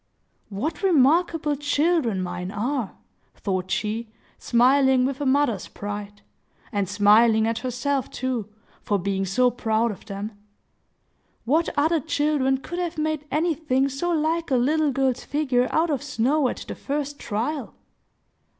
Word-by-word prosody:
"What 290 +11 -3
remarkable 320 -2 +3
children 290 - +1
mine 180 0 -4
are!" 230 +3 -2 0.4
thought 185 -2 -3
she, 215 +5 -2 0.3
smiling 260 +1 +4
with 275 +1 -3
a 285 - 0
mother's 260 -7 +1
pride; 205 0 -7 0.5
and, 200 -4 -1
smiling 220 +2 +5
at 225 0 -1
herself, 255 +2 -2
too, 245 -5 -3 0.3
for 205 - 0
being 195 +1 -1
so 250 +6 +3
proud 225 -1 0
of 200 - -11
them. 200 +1 -5 1.1
"What 315 +7 +2
other 315 +3 +3
children 290 -3 +1
could 345 +6 -6
have 345 -2 -3
made 310 -1 -2
anything 300 -4 +1
so 275 +6 -2
like 325 0 0
a 265 - +2
little 295 +4 +2
girl's 260 -1 0
figure 260 -4 +1
out 325 +1 +1
of 275 -4 -1
snow 275 +1 +1
at - - -5
the - - -4
first 290 0 -4
trial? 240 +7 -3
265 Hz, 140 wpm, -24 LUFS, 220-300 Hz, 1.1 s, smiling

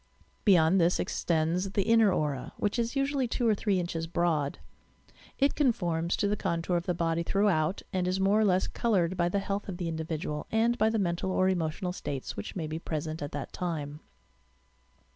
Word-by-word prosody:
Beyond 180 -2 +5
this 170 +2 +3
extends 175 +4 0
the 200 - +2
"inner 225 -1 +5
aura," 145 -7 -2
which 205 +3 -1
is 235 +3 -1
usu 275 +1 0
ally 265 -2 +2
two 235 +1 0
or 220 - +5
three 200 -2 0
inches 165 -2 -3
broad. 160 -4 0 0.8
It 275 +1 +3
conforms 175 - +1
to 205 - +1
the 205 - +1
con 170 -4 -2
tour 180 - 0
of 170 +1 -1
the 180 - +1
body 165 0 0
throughout 185 -2 +1
and 185 -1 0
is 185 +1 0
more 195 +2 +3
or - - +4
less 185 -2 +3
coloured 190 -6 +1
by 175 -1 +1
the 200 - 0
health 200 +1 -3
of 180 - -4
the 175 -2 -3
individual 160 -1 -4
and 230 +2 +2
by 220 -2 +3
the 225 - 0
mental 180 -2 -1
or 185 0 +2
emotional 180 0 -1
states, 140 -6 -5
which 100 - -6
may 170 -4 -2
be 155 +1 -4
present 155 -1 -4
at 145 - -4
that 145 -1 -5
time. 150 -4 -4
180 Hz, 200 wpm, -29 LUFS, 165-200 Hz, 0.8 s, Beyond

